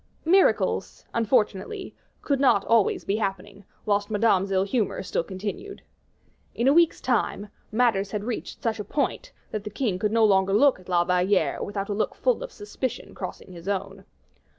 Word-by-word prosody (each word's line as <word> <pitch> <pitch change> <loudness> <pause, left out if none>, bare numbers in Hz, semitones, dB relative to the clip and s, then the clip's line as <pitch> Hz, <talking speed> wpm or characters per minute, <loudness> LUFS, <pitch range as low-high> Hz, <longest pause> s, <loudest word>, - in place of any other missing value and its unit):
Miracles, 375 +4 +2
unfortunately, 230 - 0 0.3
could 280 -2 0
not 260 -7 +4
be - - -15
always 230 -3 +3
happening, 195 -1 -3 0.2
whilst 205 -1 +1
Madame's 205 -3 +2
ill 190 -1 +2
humor 200 -2 -1
still - - -1
continued. 205 - -6 0.7
In 235 - +1
a 275 - +6
week's 335 0 +4
time, 210 -4 -1 0.2
matters 215 -4 +2
had 205 0 -3
reached 235 +1 -5
such 225 -2 -1
a - - -2
point, 285 +7 -2 0.2
that 215 -2 -3
the 210 - -5
king 210 -4 -2
could 210 0 0
no 225 0 +4
longer 195 -1 +3
look 260 +2 +4
at 185 - -16
La 175 -1 +3
Valliere 180 +2 +1
without 200 -1 -3
a - - 0
look 215 - -1
full - - +1
of - - -6
suspicion 415 - -5
crossing - - -7
his 175 0 -11
own. 195 0 -3
205 Hz, 175 wpm, -25 LUFS, 195-235 Hz, 0.7 s, a